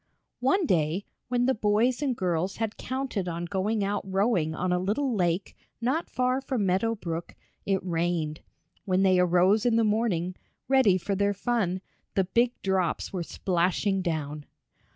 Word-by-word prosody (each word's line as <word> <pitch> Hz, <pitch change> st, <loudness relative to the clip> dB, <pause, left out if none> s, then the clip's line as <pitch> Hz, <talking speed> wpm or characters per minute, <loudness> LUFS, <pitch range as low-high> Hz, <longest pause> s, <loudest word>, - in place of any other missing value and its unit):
One 275 Hz, +9 st, +2 dB
day, 170 Hz, -, +1 dB, 0.2 s
when 245 Hz, 0 st, +1 dB
the 265 Hz, -, +3 dB
boys 225 Hz, +4 st, +2 dB
and 270 Hz, -4 st, 0 dB
girls 180 Hz, 0 st, -1 dB
had 220 Hz, -1 st, -2 dB
counted 255 Hz, -7 st, -3 dB
on 170 Hz, 0 st, -3 dB
going 205 Hz, +3 st, -1 dB
out 200 Hz, +1 st, -1 dB
rowing 190 Hz, -4 st, +1 dB
on 180 Hz, +2 st, -1 dB
a 180 Hz, -, +2 dB
little 230 Hz, +8 st, 0 dB
lake 180 Hz, -2 st, 0 dB, 0.2 s
not 260 Hz, +8 st, -1 dB
far 255 Hz, +1 st, 0 dB
from 255 Hz, -6 st, -1 dB
Meadow 195 Hz, +5 st, +1 dB
Brook, 170 Hz, -4 st, -5 dB, 0.3 s
it 190 Hz, -2 st, 0 dB
rained. 165 Hz, -3 st, -1 dB, 0.4 s
When 185 Hz, 0 st, +2 dB
they 185 Hz, -1 st, +4 dB
arose 180 Hz, +4 st, +4 dB
in 240 Hz, -2 st, +3 dB
the 230 Hz, -, +4 dB
morning, 205 Hz, -5 st, 0 dB, 0.3 s
ready 260 Hz, -8 st, +5 dB
for 200 Hz, +2 st, -3 dB
their 200 Hz, +1 st, +1 dB
fun, 200 Hz, -4 st, 0 dB, 0.3 s
the 195 Hz, -, +3 dB
big 235 Hz, +6 st, +1 dB
drops 190 Hz, -2 st, 0 dB
were 185 Hz, -, -2 dB
splashing 185 Hz, +3 st, 0 dB
down. 150 Hz, -4 st, -3 dB
195 Hz, 160 wpm, -27 LUFS, 180-230 Hz, 0.4 s, ready